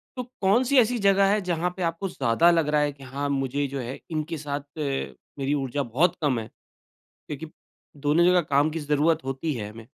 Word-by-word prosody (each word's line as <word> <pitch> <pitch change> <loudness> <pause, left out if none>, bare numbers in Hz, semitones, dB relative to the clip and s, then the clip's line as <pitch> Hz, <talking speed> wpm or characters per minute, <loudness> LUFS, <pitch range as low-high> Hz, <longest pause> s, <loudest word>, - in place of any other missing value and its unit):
तो 250 - -3 0.2
कौन-सी 240 +8 +3
ऐसी 245 +1 +3
जगह 200 0 +4
है 210 - +2
जहाँ 175 -1 -1
पे 180 - -2
आपको 170 +4 -1
ज़्यादा 140 +4 +3
लग 165 -3 +2
रहा 150 0 +3
है 145 - +1
कि 140 -1 -15
हाँ, 140 +2 -4
मुझे 140 +1 -1
जो 135 0 -5
है 125 +2 -5
इनके 155 +1 -3
साथ 145 -1 -4 0.2
मेरी 140 0 -3
ऊर्जा 140 0 -1
बहुत 145 +9 +1
कम 135 -6 +1
है। 110 - -6 0.8
क्योंकि 150 +2 -6 0.5
दोनों 150 +4 +3
जगह 180 0 +5
काम 145 0 +2
की 165 - -4
ज़रूरत 150 +2 +1
होती 135 +4 -2
है, 105 -3 -5
हमें। 110 +1 -12
150 Hz, 200 wpm, -25 LUFS, 135-170 Hz, 0.8 s, जगह